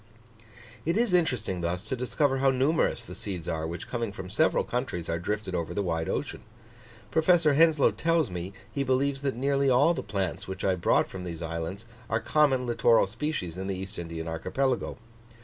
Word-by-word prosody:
It 170 Hz, +5 st, 0 dB
is 230 Hz, -4 st, +2 dB
interesting 120 Hz, -, +1 dB
thus 90 Hz, +4 st, -2 dB
to -, -, -1 dB
discover 130 Hz, +3 st, 0 dB
how 135 Hz, 0 st, +4 dB
numerous 135 Hz, +5 st, +1 dB
the -, -, -8 dB
seeds 90 Hz, -5 st, -6 dB
are, 80 Hz, 0 st, -2 dB
which, 85 Hz, +2 st, -6 dB
coming 115 Hz, -3 st, -2 dB
from 95 Hz, -2 st, -8 dB
several 155 Hz, +10 st, +3 dB
countries, 120 Hz, -9 st, -3 dB
are 85 Hz, 0 st, 0 dB
drifted 105 Hz, +1 st, -3 dB
over 85 Hz, 0 st, -2 dB
the 100 Hz, -, 0 dB
wide 80 Hz, -3 st, -1 dB
ocean. -, -, -3 dB, 0.7 s
Professor 160 Hz, -2 st, +4 dB
Henslow 155 Hz, -1 st, +5 dB
tells 165 Hz, -, +1 dB
me, 90 Hz, +1 st, -4 dB, 0.2 s
he 140 Hz, -, 0 dB
believes 135 Hz, +1 st, +1 dB
that 135 Hz, -3 st, -1 dB
nearly 140 Hz, +2 st, +2 dB
all 140 Hz, +7 st, +5 dB
the -, -, -3 dB
plants 100 Hz, -2 st, -3 dB
which 95 Hz, 0 st, -6 dB
I 95 Hz, -, +3 dB
brought 90 Hz, -2 st, +2 dB
from 95 Hz, -1 st, -7 dB
these 85 Hz, -2 st, -5 dB
islands, 85 Hz, +6 st, -4 dB, 0.2 s
are 110 Hz, -, +1 dB
common 135 Hz, 0 st, +2 dB
littoral 120 Hz, -1 st, +4 dB
species 100 Hz, -, -4 dB
in 95 Hz, -, -4 dB
the 100 Hz, -, -1 dB
East 95 Hz, 0 st, -6 dB
Indian 85 Hz, -1 st, -5 dB
archipelago. 125 Hz, +11 st, -1 dB
110 Hz, 185 wpm, -28 LUFS, 90-140 Hz, 0.7 s, Henslow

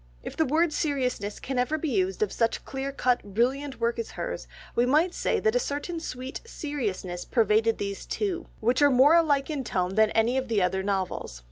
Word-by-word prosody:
If -, -, -7 dB
the 320 Hz, -, +1 dB
word 315 Hz, +3 st, +2 dB
seriousness 250 Hz, -, -1 dB
can 265 Hz, -1 st, -3 dB
ever 275 Hz, +5 st, +1 dB
be 315 Hz, 0 st, -2 dB
used 190 Hz, -4 st, +1 dB
of 210 Hz, -, -2 dB
such 230 Hz, -1 st, 0 dB
clear 270 Hz, +1 st, -4 dB
cut, 250 Hz, -2 st, +1 dB
brilliant 265 Hz, +4 st, 0 dB
work 235 Hz, 0 st, 0 dB
as 230 Hz, -, -3 dB
hers, -, -, -4 dB, 0.3 s
we 240 Hz, -, +3 dB
might 310 Hz, +8 st, +3 dB
say -, -, 0 dB
that 440 Hz, 0 st, +2 dB
a -, -, +4 dB
certain 330 Hz, -3 st, -3 dB
sweet 260 Hz, -4 st, -6 dB
seriousness 225 Hz, -, -4 dB
pervaded 225 Hz, -1 st, +2 dB
these 200 Hz, -1 st, -5 dB
two, 365 Hz, -5 st, -2 dB
which 245 Hz, +5 st, +2 dB
are 290 Hz, -, +7 dB
more 270 Hz, +4 st, +6 dB
alike 305 Hz, -4 st, +3 dB
in 285 Hz, -3 st, -2 dB
tone 185 Hz, -5 st, -1 dB
than 220 Hz, +1 st, +4 dB
any 230 Hz, +4 st, +2 dB
of 260 Hz, -, -5 dB
the 225 Hz, -3 st, +1 dB
other 190 Hz, +1 st, +1 dB
novels. 190 Hz, -, -3 dB
255 Hz, 205 wpm, -27 LUFS, 215-290 Hz, 0.3 s, are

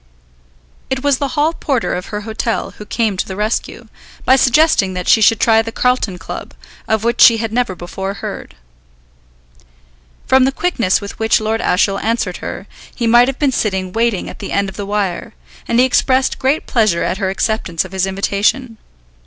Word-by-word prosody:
It 265 Hz, 0 st, -2 dB
was 285 Hz, -2 st, +2 dB
the 280 Hz, -, 0 dB
hall 305 Hz, +3 st, +2 dB
porter 275 Hz, -7 st, -1 dB
of 180 Hz, +1 st, -4 dB
her 210 Hz, 0 st, -5 dB
hotel 220 Hz, +1 st, -3 dB
who 210 Hz, -, -8 dB
came 220 Hz, -5 st, -1 dB
to -, -, -2 dB
the 190 Hz, -, -6 dB
rescue, 210 Hz, +3 st, -3 dB, 0.4 s
by 260 Hz, -, +6 dB
suggesting 260 Hz, -, +3 dB
that 180 Hz, -1 st, -4 dB
she 220 Hz, -, +5 dB
should 220 Hz, +1 st, +4 dB
try 225 Hz, -1 st, +4 dB
the 225 Hz, 0 st, -6 dB
Carlton 250 Hz, -7 st, 0 dB
Club, 165 Hz, -, -8 dB, 0.3 s
of 220 Hz, -1 st, 0 dB
which 235 Hz, +1 st, 0 dB
she 230 Hz, -2 st, +8 dB
had 225 Hz, -1 st, -3 dB
never 240 Hz, -6 st, 0 dB
before 190 Hz, +3 st, -5 dB
heard. 175 Hz, -, -7 dB, 1.7 s
From 260 Hz, 0 st, +4 dB
the 265 Hz, -, +1 dB
quickness 255 Hz, -, 0 dB
with 200 Hz, -, -9 dB
which 220 Hz, 0 st, +2 dB
Lord 220 Hz, +1 st, -1 dB
Ashiel 195 Hz, +2 st, +1 dB
answered 220 Hz, -5 st, -1 dB
her, -, -, -7 dB, 0.3 s
he 235 Hz, -, -2 dB
might 240 Hz, +2 st, +5 dB
have 270 Hz, 0 st, -3 dB
been 285 Hz, -3 st, +1 dB
sitting 190 Hz, -6 st, -2 dB
waiting 230 Hz, -3 st, 0 dB
at -, -, -9 dB
the -, -, -6 dB
end 200 Hz, 0 st, 0 dB
of 195 Hz, -, -11 dB
the 200 Hz, -1 st, -5 dB
wire, 200 Hz, -1 st, -3 dB, 0.3 s
and 235 Hz, -, +1 dB
he 255 Hz, -, +6 dB
expressed 260 Hz, 0 st, +1 dB
great 275 Hz, +4 st, 0 dB
pleasure 215 Hz, -8 st, +1 dB
at 190 Hz, -, -2 dB
her 190 Hz, -3 st, -1 dB
acceptance 190 Hz, -4 st, -1 dB
of 185 Hz, -, -11 dB
his 190 Hz, 0 st, -1 dB
invitation. 205 Hz, +5 st, -1 dB
220 Hz, 190 wpm, -17 LUFS, 195-250 Hz, 1.7 s, she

